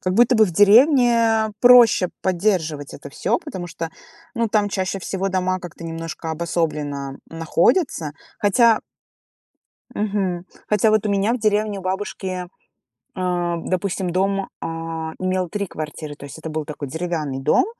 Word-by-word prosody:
Как 185 Hz, 0 st, -1 dB
будто 240 Hz, +3 st, +5 dB
бы 220 Hz, -, +6 dB
в -, -, -4 dB
деревне 230 Hz, -, +5 dB
проще 240 Hz, -7 st, +7 dB
поддерживать 170 Hz, -6 st, 0 dB
это 140 Hz, -, -10 dB
всё, 215 Hz, +10 st, 0 dB
потому 180 Hz, -2 st, -7 dB
что, 165 Hz, -1 st, -5 dB, 0.4 s
ну, 230 Hz, -1 st, 0 dB
там 210 Hz, -1 st, +2 dB
чаще 190 Hz, 0 st, -2 dB
всего 195 Hz, +1 st, -2 dB
дома 185 Hz, 0 st, 0 dB
как-то 170 Hz, -1 st, -9 dB
немножко 165 Hz, 0 st, -5 dB
обособленно 150 Hz, -4 st, -2 dB
находятся. 165 Hz, -, +1 dB, 0.3 s
Хотя. 225 Hz, +2 st, +4 dB, 1.1 s
Мгм. 195 Hz, -4 st, -1 dB, 0.2 s
Хотя 210 Hz, +1 st, +3 dB
вот 215 Hz, 0 st, +2 dB
у -, -, 0 dB
меня 200 Hz, +3 st, +2 dB
в 250 Hz, -, -1 dB
деревне, 210 Hz, -1 st, +1 dB
у -, -, -8 dB
бабушки, 185 Hz, -1 st, -3 dB, 0.7 s
а, 175 Hz, -2 st, 0 dB
допустим, 185 Hz, +1 st, -2 dB
дом, 195 Hz, +2 st, 0 dB
а, 165 Hz, -1 st, -4 dB
имел 185 Hz, -1 st, 0 dB
3 200 Hz, +1 st, -3 dB
квартиры. 150 Hz, -1 st, -6 dB
То 140 Hz, -, -10 dB
есть 140 Hz, -, -10 dB
это 160 Hz, 0 st, -7 dB
был 155 Hz, -1 st, -3 dB
такой 150 Hz, -2 st, -6 dB
деревянный 160 Hz, -4 st, -3 dB
дом, 150 Hz, -, +3 dB
185 Hz, 150 wpm, -21 LUFS, 165-210 Hz, 1.1 s, проще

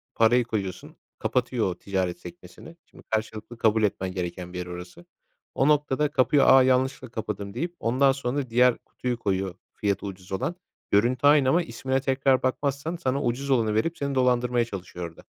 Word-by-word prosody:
Parayı 120 Hz, +2 st, +4 dB
koyuyorsun, 100 Hz, -5 st, -5 dB, 0.2 s
kapatıyor 125 Hz, -3 st, 0 dB
o -, -, -7 dB
ticaret 95 Hz, -3 st, -2 dB
sekmesini. 170 Hz, -, -12 dB
Şimdi -, -, -18 dB
karşılıklı 110 Hz, +1 st, -4 dB
kabul 110 Hz, -1 st, +2 dB
etmen 95 Hz, -2 st, -1 dB
gereken 90 Hz, -1 st, -5 dB
bir -, -, -5 dB
yer 90 Hz, -, -4 dB
orası. 90 Hz, 0 st, -9 dB, 0.5 s
O 135 Hz, -, +2 dB
noktada 150 Hz, -1 st, +2 dB
kapıyı, 140 Hz, +1 st, +3 dB
"A, 130 Hz, 0 st, +7 dB
yanlışlıkla 130 Hz, 0 st, +1 dB
kapadım." 105 Hz, -3 st, -5 dB
deyip 170 Hz, -, -4 dB
ondan 130 Hz, +4 st, +3 dB
sonra 135 Hz, -1 st, -3 dB
diğer 125 Hz, +1 st, +4 dB
kutuyu 125 Hz, -1 st, -5 dB
koyuyor, 95 Hz, -3 st, -1 dB, 0.2 s
fiyatı 100 Hz, -1 st, -2 dB
ucuz 95 Hz, -1 st, -9 dB
olan. 95 Hz, -, -2 dB, 0.4 s
Görüntü 120 Hz, +6 st, +3 dB
aynı 145 Hz, -3 st, +5 dB
ama 170 Hz, +5 st, +3 dB
ismine 130 Hz, -4 st, -2 dB
tekrar 135 Hz, -1 st, +2 dB
bakmazsan 140 Hz, +5 st, -1 dB
sana 140 Hz, -5 st, -1 dB
ucuz 130 Hz, +4 st, -2 dB
olanı 115 Hz, -5 st, +2 dB
verip 165 Hz, +10 st, 0 dB
seni 140 Hz, -1 st, -2 dB
dolandırmaya 125 Hz, -2 st, +2 dB
çalışıyor 90 Hz, -5 st, -7 dB
orada. 80 Hz, -, -17 dB
120 Hz, 170 wpm, -26 LUFS, 100-135 Hz, 0.5 s, A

